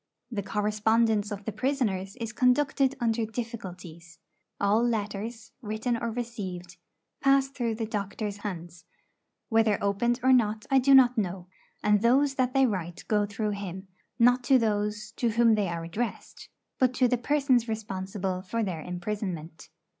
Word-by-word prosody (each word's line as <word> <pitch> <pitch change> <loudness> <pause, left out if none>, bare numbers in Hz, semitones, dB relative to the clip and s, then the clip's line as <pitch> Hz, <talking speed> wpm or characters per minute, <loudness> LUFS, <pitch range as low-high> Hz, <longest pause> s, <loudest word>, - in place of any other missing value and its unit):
The 215 -4 -2
correspondence 210 +1 +1
of 205 -1 -6
the 220 - -2
prisoners 215 -8 -1
is 230 -2 -5
conducted 270 +2 +2
under 230 -1 +1
difficulties. 185 -8 -7 0.4
All 205 +3 +3
letters, 225 0 -3
written 220 +2 -2
or 230 0 -2
received, 195 -7 -6 0.4
pass 275 0 +3
through 240 -5 -2
the 225 0 -3
doctor's 205 -1 -4
hands, 175 -5 -7 0.6
whether 225 -2 +3
opened 220 +5 0
or 260 0 +5
not 215 -3 +2
I 270 - +6
do 270 +1 +6
not 250 -2 +6
know; 180 -2 -4 0.3
and 210 -1 +3
those 270 +4 +3
that 255 -1 0
they 270 0 +5
write 180 -7 -3
go 210 -1 +2
through 210 +1 -2
him, 190 -1 -6 0.3
not 245 +1 +4
to 265 +2 +6
those 210 -2 -1
to 240 - +1
whom 230 0 +4
they 210 -2 +1
are 170 -1 -4
addressed, 210 +8 -5 0.3
but 255 -1 +3
to 255 0 +4
the 245 0 0
persons 265 -2 +2
responsible 190 -3 -3
for 225 +5 -2
their 180 -6 -3
imprisonment. 180 -2 -5
215 Hz, 155 wpm, -28 LUFS, 195-240 Hz, 0.6 s, I